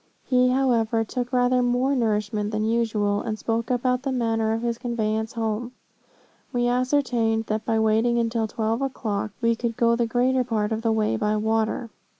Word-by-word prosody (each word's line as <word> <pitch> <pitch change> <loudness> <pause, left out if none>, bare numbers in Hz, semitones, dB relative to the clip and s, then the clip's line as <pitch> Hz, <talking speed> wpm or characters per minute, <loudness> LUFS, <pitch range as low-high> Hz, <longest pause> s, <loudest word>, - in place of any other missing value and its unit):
He, 250 -1 +3
however, 235 -4 +2
took 245 +2 -4
rather 250 0 +3
more 250 +3 +1
nourishment 210 -3 0
than 215 0 -1
usual, 215 -3 0
and 215 -1 -3
spoke 225 +1 -2
about 250 0 +1
the 270 0 -2
manner 225 -3 0
of 225 +1 -2
his 235 -1 -2
conveyance 220 -2 -2
home. 230 +1 -3 0.8
We 240 -2 +1
ascertained 245 -3 +1
that 215 +1 -2
by 225 - +1
waiting 220 +2 +2
until 230 -1 0
twelve 225 +2 -2
o'clock, 220 -6 -2
we 230 0 +2
could 230 -1 -3
go 235 0 +3
the 235 0 0
greater 250 +2 +2
part 220 -3 -1
of 220 0 -1
the 225 -1 +1
way 215 -1 +1
by 210 0 0
water. 220 +2 -1
230 Hz, 175 wpm, -24 LUFS, 220-245 Hz, 0.8 s, He